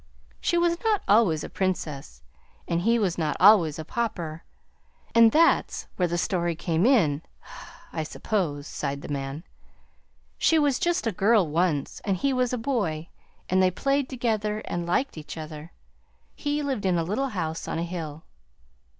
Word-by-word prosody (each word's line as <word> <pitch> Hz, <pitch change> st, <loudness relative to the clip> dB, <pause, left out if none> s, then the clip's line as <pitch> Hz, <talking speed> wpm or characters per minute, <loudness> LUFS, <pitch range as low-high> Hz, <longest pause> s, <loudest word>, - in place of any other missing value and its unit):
"She 345 Hz, -, +1 dB
was 340 Hz, 0 st, +2 dB
not 435 Hz, -3 st, +1 dB
always 195 Hz, -8 st, +4 dB
a -, -, -4 dB
Princess, 150 Hz, -, -3 dB, 0.4 s
and 170 Hz, 0 st, 0 dB
he 230 Hz, +5 st, +3 dB
was 190 Hz, -6 st, 0 dB
not 155 Hz, -2 st, -1 dB
always 185 Hz, -6 st, +6 dB
a 160 Hz, -, -6 dB
Pauper, 170 Hz, -8 st, -3 dB, 0.7 s
and 230 Hz, -1 st, +7 dB
that's 330 Hz, +5 st, +3 dB
where 180 Hz, -, +1 dB
the 175 Hz, 0 st, -2 dB
story 175 Hz, -1 st, 0 dB
came 165 Hz, +5 st, +1 dB
in, 165 Hz, -, +3 dB, 0.7 s
I 160 Hz, -, -2 dB
suppose," 155 Hz, -3 st, -2 dB
sighed 140 Hz, -1 st, -4 dB
the -, -, -8 dB
man. 135 Hz, +3 st, -4 dB, 1.0 s
"She 325 Hz, -, +4 dB
was 290 Hz, -4 st, +2 dB
just 345 Hz, -5 st, 0 dB
a 225 Hz, -, +1 dB
girl, 200 Hz, 0 st, +3 dB
once, 155 Hz, -2 st, -1 dB
and 195 Hz, -2 st, 0 dB
he 275 Hz, +7 st, 0 dB
was 255 Hz, -1 st, +1 dB
a 250 Hz, -, -1 dB
boy; 205 Hz, -, -2 dB, 0.4 s
and 185 Hz, +1 st, +2 dB
they 185 Hz, -, +5 dB
played 275 Hz, +8 st, 0 dB
together 215 Hz, -4 st, -1 dB
and 175 Hz, 0 st, -3 dB
liked 180 Hz, -, 0 dB
each 155 Hz, -, -9 dB
other. 155 Hz, 0 st, -8 dB, 0.6 s
He 290 Hz, 0 st, -2 dB
lived 260 Hz, -9 st, -1 dB
in 180 Hz, -2 st, +2 dB
a 165 Hz, -, +1 dB
little 225 Hz, +11 st, -1 dB
house 165 Hz, -7 st, -4 dB
on -, -, -2 dB
a 165 Hz, -, -1 dB
hill." 160 Hz, -3 st, -6 dB
185 Hz, 165 wpm, -26 LUFS, 160-235 Hz, 1.0 s, and